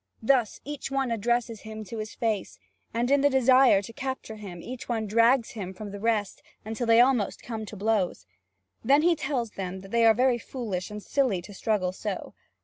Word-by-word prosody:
Thus 245 -3 +2
each 290 -1 -5
one 270 -2 -1
addresses 230 0 0
him 220 0 -7
to 220 +2 -7
his 215 -1 -6
face, 220 -4 -2 0.3
and 240 +3 0
in 280 0 +5
the 285 - +5
desire 260 -5 +5
to 230 - -9
capture 260 -5 -5
him, 190 -5 -8
each 245 +8 -8
one 225 -2 -1
drags 230 +4 +3
him 190 -6 -6
from 205 +1 -7
the 200 - -7
rest, 215 -2 -1 0.2
until 225 +2 -3
they 230 0 +6
almost 245 -4 +2
come 220 -2 -5
to 210 - -8
blows. 200 - 0 0.6
Then 280 +5 +4
he 345 0 +4
tells 260 -7 -2
them 190 -1 -5
that 195 +1 -12
they 235 0 +3
are 220 - +6
very 250 -1 +3
foolish 215 -8 -4
and 210 -1 -7
silly 255 -10 +1
to 205 - -11
struggle 195 -2 0
so. 195 +1 -5
225 Hz, 200 wpm, -27 LUFS, 205-255 Hz, 0.6 s, they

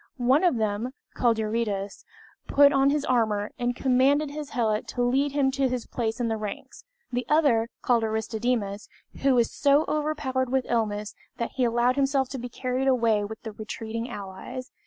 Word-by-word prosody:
One 260 +6 +3
of 350 -7 +4
them 220 +3 -1 0.2
called 235 -2 +2
Eurytus, 215 -3 -2 0.4
put 285 0 +6
on 275 0 +4
his 290 0 0
armor, 215 -4 +1
and 245 0 0
commanded 270 +4 +2
his 295 -1 -6
helot 220 -3 0
to 245 - -2
lead 270 +3 +1
him 275 -2 +2
to 270 0 +1
his 250 -2 -3
place 225 -1 -3
in 240 - 0
the 225 -1 -1
ranks; 210 - -7 0.3
the 245 0 -1
other, 275 -7 +3
called 235 -2 +3
Aristodemus, 220 -1 -2 0.3
was 250 -4 +3
so 285 +2 +3
overpowered 295 -4 -1
with 265 0 +1
illness 210 -3 -1 0.2
that 235 - -3
he 255 - 0
allowed 240 +2 +2
himself 270 -1 +1
to 265 - -5
be 245 +1 -6
carried 255 +2 -2
away 230 -5 +3
with 220 +2 -7
the 220 - -5
retreating 225 +2 -5
allies. 210 +5 -7
245 Hz, 175 wpm, -26 LUFS, 220-270 Hz, 0.4 s, put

